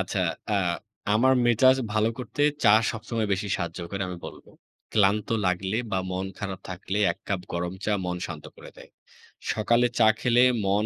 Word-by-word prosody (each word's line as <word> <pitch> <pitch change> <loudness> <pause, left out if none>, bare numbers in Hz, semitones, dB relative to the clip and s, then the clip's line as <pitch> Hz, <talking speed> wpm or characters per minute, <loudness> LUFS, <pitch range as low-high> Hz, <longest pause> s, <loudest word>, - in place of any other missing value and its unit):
আচ্ছা, - - -2 0.4
আ - - +3 0.6
আমার 130 +4 +4
মেজাজ 130 +3 +5 0.2
ভালো 110 +1 +2
করতে 135 +3 -3 0.2
চা 105 - +7 0.2
সবসময় 115 -1 -3
বেশি 100 +1 -1
সাহায্য 85 -1 -4
করে 100 -1 -3
আমি 90 - -5
বলব। - - -11 0.5
ক্লান্ত 105 0 +2 0.2
লাগলে 95 +3 0 0.2
বা 95 - +2
মন 95 +1 -2
খারাপ 95 -2 -5
থাকলে 95 +2 -4
এক - - -18
কাপ 100 -2 -1
গরম 85 0 -2
চা 105 - +1
মন 90 0 -2
শান্ত 80 -3 -8
করে - - -12
দেয়। - - -14 0.6
সকালে 115 +3 +2
চা - - +6
খেলে 120 0 +4 0.2
মন 100 +2 +2
100 Hz, 170 wpm, -26 LUFS, 95-115 Hz, 0.6 s, চা